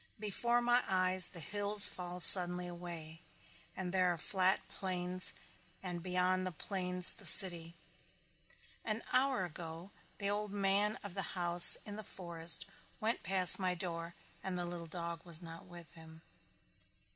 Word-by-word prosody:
Before 235 +4 -4
my 245 +1 0
eyes 185 -1 0
the 175 - -10
hills 205 +5 +3
fall 180 0 -7
suddenly 180 0 +8
away 170 -2 -11 0.6
and 185 -1 -8
there 185 -1 -1
are 175 - -7
the - - -13
flat 190 0 -3
plains 180 -1 -5 0.5
and 175 -2 -8
beyond 185 +1 -4
the - - -7
plains 180 +1 +2
the - - -14
city. 170 -3 +3 1.1
An 220 0 -7
hour 255 -6 -2
ago 165 +2 -12 0.3
the 200 - -7
old 205 0 -6
man 200 +1 -2
of 205 -3 -11
the 195 - -5 0.2
house 175 0 +7
in 205 0 -10
the 215 - -10
forest 170 -3 -1 0.3
went 225 +2 -5
past 185 0 +4
my 185 -1 -4
door 170 -1 -8 0.3
and 190 -1 -7
the 175 - -6
little 175 -1 -10
dog 170 0 -9
was 170 -3 -5
not 165 +3 -13
with 175 -2 -16
him. 160 -1 -18
180 Hz, 155 wpm, -31 LUFS, 170-195 Hz, 1.1 s, suddenly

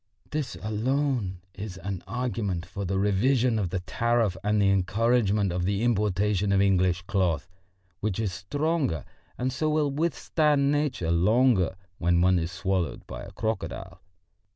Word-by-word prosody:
This 150 -9 -2
alone 110 -3 -1
is 100 -2 -7
an 95 0 -5
argument 105 -6 -2
for 100 +2 -5
the 95 +1 -1
revision 115 +4 +2
of 95 -4 -1
the 95 +1 -2
tariff 115 0 +1
and 105 +1 +2
the 100 -1 +4
encouragement 105 +1 +2
of 90 0 -1
the 100 +3 0
importation 105 -3 +1
of 100 - +3
English 95 -2 +2
cloth, 90 -6 0 0.5
which 105 -3 -2
is 105 -5 -1
stronger 140 - -1 0.3
and 130 +1 -1
so 155 +4 0
will 150 -2 +1
withstand 150 -2 +1
Nature 145 - 0
longer 100 +2 +3 0.2
when 85 0 +2
one 90 0 +4
is 85 +1 -3
swallowed 95 -3 -2
by - - -7
a - - -9
crocodile. 110 0 -4
100 Hz, 150 wpm, -27 LUFS, 95-125 Hz, 0.5 s, the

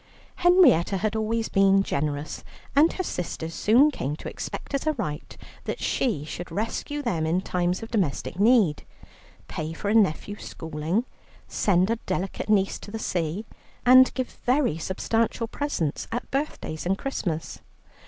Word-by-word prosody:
Henrietta 350 - +5
had 215 +3 -1
always 220 +1 0
been 195 0 +4
generous, 145 -2 -3 0.3
and 300 +4 +5
her 370 - -2
sisters 165 - -4
soon 250 - +4
came 145 - -3
to - - -9
expect - - -6
as 275 +2 -1
a 310 - +3
right 170 - -5 0.3
that - - -3
she 205 - 0
should 175 +3 -7
rescue 260 +7 -3
them 165 - 0
in 170 +3 +2
times 180 +1 -1
of 225 - -8
domestic 180 - -1
need: 210 -8 +4 0.7
pay 155 +1 -4
for 200 - -3
a - - +2
nephew's 205 0 +1
schooling, 160 +8 -2 0.4
send 190 +1 +2
a 230 - +1
delicate 190 +2 -3
niece 195 -2 +2
to - - -10
the 225 - -4
sea, 175 0 -2 0.4
and 255 +1 +8
give 255 -1 -4
very 255 - +2
substantial 225 +6 0
presents 225 - -2
at 240 +2 -4
birthdays 270 - -3
and 195 +1 +1
Christmas. 175 - -3
200 Hz, 155 wpm, -26 LUFS, 165-240 Hz, 0.7 s, and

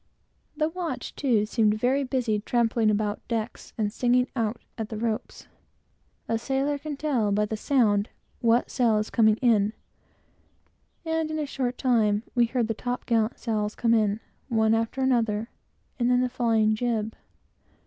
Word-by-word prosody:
The 310 0 +2
watch, 350 0 -5
too, 235 -7 +2
seemed 215 -1 +2
very 255 +5 +1
busy 250 -5 0
trampling 230 0 +1
about 210 0 0
decks, 230 -1 -4
and 210 -2 -1
singing 250 +1 +2
out 225 -1 -1 0.2
at 220 -2 -5
the 220 - -5
ropes. 225 0 -3 0.8
A 225 0 0
sailor 275 +4 -1
can 305 +1 -5
always - - -7
tell, 255 -9 0
by 210 +1 +2
the 220 - -3
sound, 215 -4 +2 0.3
what 235 0 +2
sail 230 -4 +2
is 215 0 -2
coming 220 -2 +4
in, 215 -3 +3 1.3
and, 320 -1 -1
in 310 - -3
a 305 - -1
short 255 -3 -3
time, 220 -4 +2
we 240 -1 +4
heard 235 -1 0
the 225 - -1
top 245 +3 -4
gallant 225 -1 +1
sails 215 -2 -2
come 230 -1 +2
in, 215 -2 +2 0.3
one 220 -2 +3
after 225 +4 -1
another, 230 -4 +1 0.5
and 240 0 +2
then 250 0 +4
the 255 - +1
flying 225 -3 +2
jib. 220 -1 -1
230 Hz, 165 wpm, -26 LUFS, 215-250 Hz, 1.3 s, coming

